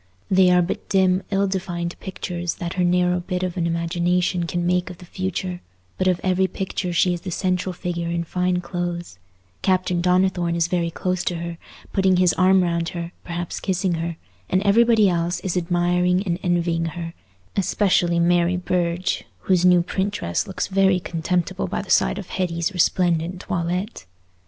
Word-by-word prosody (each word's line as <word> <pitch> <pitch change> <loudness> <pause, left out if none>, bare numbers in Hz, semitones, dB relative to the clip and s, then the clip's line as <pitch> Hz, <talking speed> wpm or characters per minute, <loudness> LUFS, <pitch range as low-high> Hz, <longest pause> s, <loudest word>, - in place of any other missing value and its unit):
They 185 -1 +6
are 180 0 +5
but 170 - -4
dim 190 -1 +3
ill 200 0 +2
defined 175 -3 -3
pictures 175 -2 -4
that 170 -1 -4
her 180 - 0
narrow 180 0 +2
bit 180 +1 -3
of 180 -2 -2
an 170 -2 0
imagination 170 +1 0
can 175 0 -2
make 180 +1 +1
of 180 - -9
the 180 - -13
future; 185 0 -4 0.4
but 185 - +1
of 180 -2 +2
every 185 0 +2
picture 185 0 -3
she 175 +1 +3
is 175 - -5
the 185 - -5
central 185 +1 -1
figure 175 -1 -4
in 170 0 -1
fine 180 +1 0
clothes; 175 - -4 0.4
Captain 185 -2 +1
Donnithorne 180 -1 +2
is 170 -1 +2
very 170 -1 0
close 185 +1 -2
to 175 - 0
her, 170 0 -5 0.3
putting 190 -2 +3
his 180 -1 +4
arm 185 0 +4
round 170 -1 0
her, 170 -1 -5
perhaps 175 0 -4
kissing 185 -1 0
her, 165 0 -3 0.3
and 185 +1 +2
everybody 225 +1 +5
else 175 -1 0
is 190 -2 -2
admiring 180 +1 +1
and 175 -3 -2
envying 170 -2 0
her—especially 170 - -1
Mary 175 +1 +3
Burge, 175 0 -1 0.2
whose 185 -2 +2
new 180 -1 +6
print 190 +3 -2
dress 85 - -2
looks 190 - -2
very 190 -1 +3
contemptible 175 0 -2
by - - -3
the - - -7
side 60 - +3
of - - -7
Hetty's 170 0 -1
resplendent 175 0 +1
toilette. 175 - -3
180 Hz, 170 wpm, -22 LUFS, 170-185 Hz, 0.4 s, They